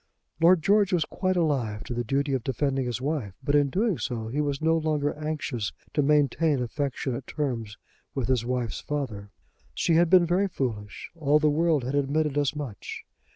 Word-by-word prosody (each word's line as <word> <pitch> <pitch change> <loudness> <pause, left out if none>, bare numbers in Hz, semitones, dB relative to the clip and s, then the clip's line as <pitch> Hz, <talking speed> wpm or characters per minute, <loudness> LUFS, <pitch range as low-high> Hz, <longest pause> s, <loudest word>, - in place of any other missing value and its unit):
Lord 170 -1 +5
George 205 -1 +4
was 170 -4 +2
quite 185 -1 -1
alive 130 -11 0
to - - -5
the 120 0 -1
duty 140 +4 0
of 130 -3 -1
defending 135 0 0
his 120 -1 -2
wife; 130 -8 -3
but 145 - 0
in 145 -1 +4
doing 200 - 0
so 115 -3 -3
he 145 +6 -1
was 145 -2 -1
no 160 +1 +2
longer 155 -2 0
anxious 150 -8 -3 0.2
to 150 - +2
maintain 150 +1 +2
affectionate 125 0 -3
terms 120 -8 -3 0.4
with 135 -4 -1
his 130 -3 +1
wife's 125 -2 -2
father. 120 -9 -4 0.5
She 170 - +1
had 170 +1 +4
been 180 -1 +6
very 180 +4 +2
foolish. 110 - -4
All 150 -2 +3
the 150 -1 +3
world 160 -2 +2
had 130 +3 -3
admitted 145 +1 +1
as 145 0 +1
much. 140 -8 -6
145 Hz, 185 wpm, -27 LUFS, 125-155 Hz, 0.5 s, been